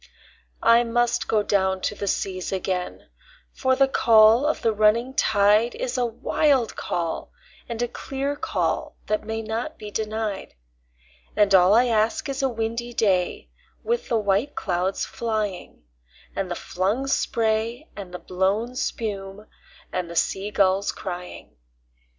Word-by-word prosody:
I 230 +1 +6
must 240 0 0
down 210 -2 +1 0.3
go - - -12
to 185 - -2
the 200 -1 -5
seas 185 -1 -2
again, 185 -1 -3 0.5
for 260 -1 +1
the 270 +1 +4
call 230 +1 +5
of 310 - -1
the 225 - +2
running 215 +4 +2
tide 210 0 +3
Is 255 0 -3
a 250 -2 +1
wild 250 +2 +1
call 165 -2 -3 0.4
and 230 -1 -4
a - - 0
clear 275 +3 -4
call - - -2
that 215 0 -1
may 225 0 -3
not 225 +7 -4
be 210 -1 -8
denied; 215 -2 -3 0.8
And 205 -2 +3
all 185 +2 +6
I 240 +2 +5
ask 225 +2 +1
is 275 +1 -2
a 270 - +2
windy 230 +1 -3
day 185 -5 0 0.3
with 475 +1 -1
the 235 - +2
white 210 +6 0
clouds 185 0 -1
flying, 215 - -4 0.5
And 195 -2 -2
the 175 - -2
flung 200 +12 -1
spray 230 +1 0
and 195 -3 -8
the 180 - -5
blown 195 +8 -1
spume, 205 -5 -4 0.5
and 180 -2 -2
the 170 - -8
sea 195 +4 0
gulls 195 -1 +2
crying. 180 -2 -8
220 Hz, 145 wpm, -24 LUFS, 195-240 Hz, 0.8 s, I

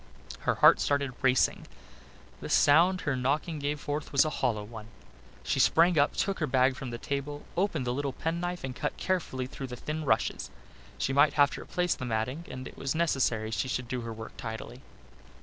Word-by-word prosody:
Her - - +3
heart - - +7
started 140 -2 0
racing. 130 -1 +2 0.7
The - - -7
sound 175 +6 +5
her 145 -2 -1
knocking 150 +5 -1
gave 145 +1 -2
forth 145 0 -4
was 140 +2 +4
a 155 - -1
hollow 110 -7 -1
one. 110 0 -10 0.6
She - - -1
sprang 165 0 +5
up, 145 - +2
took 195 -1 -1
her 155 - 0
bag 130 0 +3
from 130 0 -6
the 120 - -5
table, 140 +3 -4
opened 175 -7 0
the 120 - 0
little 140 +1 -2
penknife 175 +2 -3
and 130 -1 -4
cut - - -3
carefully 170 -9 -1
through 135 +1 -7
the 125 - -6
thin 155 +5 -4
rushes. 70 - 0 0.5
She 135 - -1
might 145 +1 +5
have 145 -1 +4
to - - -6
replace 180 0 0
the 125 - -6
matting 125 +8 -2
and 130 0 -7
it - - -12
was 135 +2 -2
necessary 130 -9 +1
she 120 - -1
should 125 -1 -3
do 125 0 -3
her 115 0 -6
work 110 0 -8
tidily. 115 +2 -7
140 Hz, 200 wpm, -29 LUFS, 125-155 Hz, 0.7 s, heart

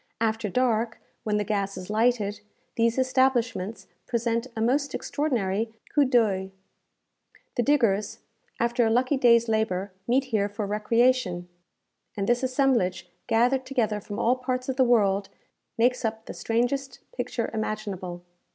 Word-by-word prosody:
After 220 -1 0
dark, 235 0 0 0.2
when 210 -1 0
the 210 - 0
gas 200 -2 -2
is 185 0 -7
lighted, 215 -2 +1 0.3
these 230 +1 +2
establishments 255 -5 +1 0.2
present 235 0 -1
a - - -4
most 275 +6 +1
extraordinary 225 -6 -1 0.2
coup 290 -2 +4
d'oeil. 215 -7 +2 1.1
The 245 - +2
diggers, 230 -7 +2 0.4
after 235 +1 +2
a 225 - +3
lucky 255 +5 +2
day's 235 -3 +4
labour, 205 -3 0 0.2
meet 255 +3 +3
here 215 -6 0
for 205 +1 -4
recreation; 210 -3 +1 0.7
and 200 - 0
this 240 0 +2
assemblage, 255 -9 +1 0.2
gathered 245 +3 +2
together 235 -6 -1
from 205 +1 -7
all 250 +2 +2
parts 255 0 -3
of 265 - -1
the 260 - +4
world, 205 -5 +2 0.5
makes 250 +2 +2
up 220 0 -3
the - - -7
strangest 250 +3 -1
picture 245 -2 -3
imaginable. 200 -5 -4
230 Hz, 140 wpm, -26 LUFS, 210-255 Hz, 1.1 s, coup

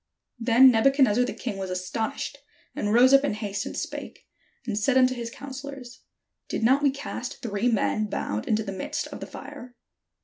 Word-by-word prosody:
Then 245 +2 +7
Nebuchadnezzar 250 -1 +4
the - - -3
king 225 -6 -5
was 190 -1 -4
astonished, 220 +9 -3 0.4
and 205 - -1
rose 250 +4 +6
up 275 0 +7
in 285 - 0
haste, 205 -2 -4
and - - -6
spake, - - -6 0.4
and 225 -4 -2
said 235 +5 +2
unto 255 0 +5
his 235 -2 -5
counsel 275 +2 -8
lors: 255 -2 -10 0.5
"Did - - -2
not 265 +5 +4
we 290 - +4
cast 270 -1 -6
three 210 0 -1
men 215 -1 +1
bound 110 - -3
into 220 0 +1
the 195 - -5
midst 190 -1 -3
of - - -8
the - - -7
fire?" 280 -4 -10
240 Hz, 190 wpm, -26 LUFS, 210-265 Hz, 0.5 s, Then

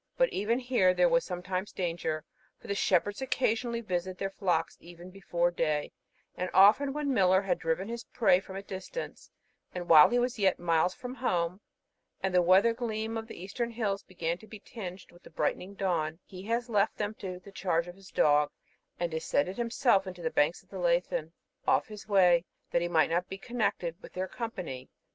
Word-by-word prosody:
But - - +4
even 220 +4 +1
here 245 -8 +2
there 180 0 +5
was 170 0 +3
sometimes 185 +2 -4
danger, 165 -3 -3 0.3
for - - -19
the 200 - -2
shepherds 200 +3 +1
occasionally 235 -2 0
visit 185 -3 -3
their 195 0 -3
flocks 175 -5 0
even 175 +1 -12
before 175 -2 0
day; 155 -3 -1 0.4
and 180 0 -3
often 210 +9 +6
when 290 -1 -1
Millar 190 -3 +4
had 185 -3 0
driven 165 +4 -1
his 235 +1 -5
prey 195 -7 +3
from 190 0 -10
a 195 - -5
distance, 195 - -7 0.5
and 175 -1 -4
while 155 -3 +9
he 245 - +1
was 245 -1 0
yet 190 -3 +3
miles 170 +1 +1
from 250 0 -7
home, 185 -7 -1 0.6
and 190 -1 -2
the 180 - +5
weather 190 +6 +5
gleam 225 -1 -3
of 225 0 -4
the - - -10
eastern 215 +6 -3
hills 215 -4 -2
began 170 -2 -3
to 220 - -15
be 215 - -9
tinged 190 -4 -9
with 175 - -19
the - - -14
brightening 195 +2 -2
dawn, 165 -5 -1
he 185 -1 -10
has 235 +2 -1
left 210 -2 +1
them 210 0 -2
to 185 -2 -5
the 185 +2 -14
charge 180 -3 0
of 175 - -8
his 195 0 -16
dog, 150 0 +3 0.5
and 170 -1 -1
descended 160 +2 -1
himself 235 -4 +2
to 185 - -5
the 160 - -1
banks 150 +4 +1
of - - -33
the - - -6
Leithen, - - 0 0.4
off - - +3
his 210 -1 -10
way, 180 -4 +5 0.3
that 170 - +2
he 175 - 0
might 165 -2 +3
not 175 +2 0
be - - -5
seen - - -25
connected 215 -8 -1
with - - -12
their 185 +1 -2
company. 185 - -6
190 Hz, 200 wpm, -30 LUFS, 175-225 Hz, 0.6 s, while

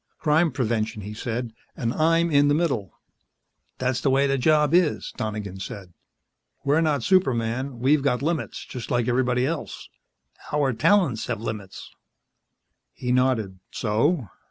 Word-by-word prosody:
"Crime 160 +1 +2
prevention," 115 -4 -2
he 105 +2 -6
said. 115 +1 -4 0.2
"And 115 0 -1
I'm 165 +1 +2
in 145 0 +5
the 145 - +3
middle." 135 - -1 0.9
"That's 130 -1 -1
the 140 - +2
way 135 +1 +3
the 135 0 +1
job 150 +2 +3
is," 175 -3 +2
Donegan 105 -3 -4
said. 95 -1 -8 0.7
"We're 145 +3 +3
not 150 -6 +1
superman. 130 -7 +1
We've 140 +5 +3
got 135 -2 0
limits, 165 0 -2
just 125 -3 -7
like 120 -2 +1
everybody 125 0 +1
else. 160 +2 -5 0.6
Our 145 -3 +1
talents 135 - +2
have 120 -3 -2
limits." 105 -4 -6 1.0
He 125 - -3
nodded. 125 -7 +1
"So?" 115 - 0
130 Hz, 140 wpm, -24 LUFS, 115-150 Hz, 1.0 s, in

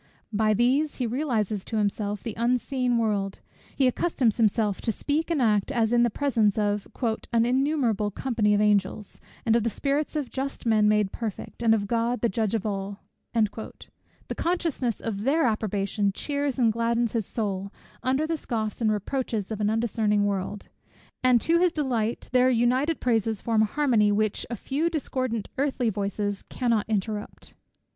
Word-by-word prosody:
By 215 0 +2
these 265 +7 +2
he 250 - -2
realizes 225 -6 -1
to 225 - -3
himself 205 0 -1
the 230 - -4
unseen 245 +1 +1
world; 205 -4 0 0.4
he 270 - +2
accustoms 255 -3 +1
himself 215 -3 +1
to 225 - 0
speak 300 +8 -1
and 330 -4 +1
act 215 -1 +2
as 235 -3 +1
in 240 - +5
the 240 - +4
presence 225 -5 +1
of 205 -1 0 0.4
"an 230 -1 +3
innumerable 250 -5 +1
company 210 -1 +1
of 205 - +2
angels, 205 0 0 0.2
and 225 -1 +4
of 235 - +3
the 230 - 0
spirits 285 +6 -1
of 290 -4 -2
just 270 0 -4
men 215 -2 +4
made 210 -2 +2
perfect, 225 0 -6
and 225 -1 +5
of 205 -2 -1
God 235 +3 0
the 235 - +2
Judge 220 +2 0
of 220 - -2
all;" 200 -1 -4 0.3
the 220 -1 -4
consciousness 325 - -1
of 205 -3 -3
their 285 +8 +2
approbation 205 -2 0
cheers 285 +2 -2
and 230 -4 +3
gladdens 235 0 +1
his 225 -4 -1
soul, 200 -3 -3 0.3
under 265 +4 +1
the 325 0 -1
scoffs 220 -5 -3
and 220 -2 +3
reproaches 215 0 -2
of 215 -1 -3
an 210 - +2
undiscerning 215 -2 +1
world, 200 0 -3 0.6
and 250 -1 +5
to 335 +1 +3
his 360 -1 +4
delighted 245 -7 -1
ear, - - -14
their 255 0 +4
united 255 +6 +2
praises 225 -3 +1
form 225 0 +1
a - - +5
harmony 230 -4 +2
which 215 0 0
a 240 - -3
few 285 - -1
discordant 255 -8 -2
earthly 265 -5 +1
voices 205 0 -2
cannot 230 -4 0
interrupt. 210 0 -3
225 Hz, 170 wpm, -26 LUFS, 210-255 Hz, 0.6 s, in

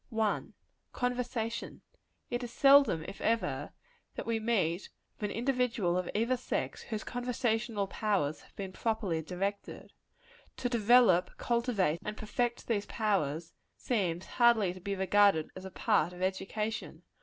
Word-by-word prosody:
1. 220 -3 -1 0.4
Conversation. 245 -2 -2 0.5
It 240 +1 -1
is 240 - -6
seldom, 275 - +5
if - - -8
ever, 230 +1 0 0.4
that - - -5
we 230 -1 0
meet 200 -6 0 0.3
with 210 - -2
an - - -5
individual 245 -7 +1
of 180 -1 -1
either 235 +4 +2
sex, 250 - -3
whose 215 -2 -5
conversational 240 -3 -1
powers 195 -7 -1
have - - -21
been 195 -2 -5
properly 210 -8 -1
directed. 195 +5 -4 0.6
To 245 - -1
develope, 225 -6 +4
cultivate 235 -9 +1
and 210 0 -5
perfect 240 +2 -2
these 210 -3 -1
powers; 170 -7 -1 0.2
seems 185 -7 -1
hardly 235 -7 +3
to 185 - -11
be 200 +2 -3
regarded 190 -3 +3
as 185 0 -8
a - - -5
part 185 -3 +1
of 180 - -10
education. 210 +3 -3
215 Hz, 140 wpm, -31 LUFS, 185-235 Hz, 0.6 s, seldom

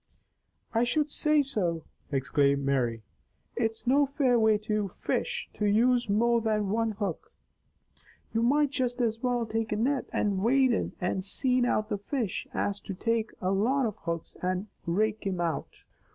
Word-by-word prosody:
"I 230 +1 +3
should 295 +5 0
say 300 -1 +3
so!" 180 - -1 0.3
exclaimed 140 0 +1
Mary. 120 -5 0 0.5
"It's 225 0 -2
no 280 +3 +4
fair 260 -3 +2
way 220 -1 +4
to 210 -1 -1
fish, 180 - -2
to 210 - -2
use 240 +2 +3
more 235 +3 +3
than 215 -2 0
one 225 0 0
hook. 200 -5 -4 1.0
You 225 - +1
might 285 +4 +3
just 255 -3 -1
as 230 -2 0
well 245 -2 0
take 225 0 -2
a - - +1
net 255 +5 0
and 200 -2 0
wade 260 +5 +4
in - - -1
and 185 0 -1
seine 250 +5 +2
out 215 -2 0
the 205 - -2
fish 225 -1 -3
as 200 0 -1
to 195 - -6
take 225 +2 0
a 185 - 0
lot 245 +8 +2
of 215 -3 -2
hooks 170 -3 -5
and 185 +3 -2 0.2
rake 215 +5 +1
thim 190 -3 -2
out." 170 -2 -3
220 Hz, 165 wpm, -28 LUFS, 195-245 Hz, 1.0 s, no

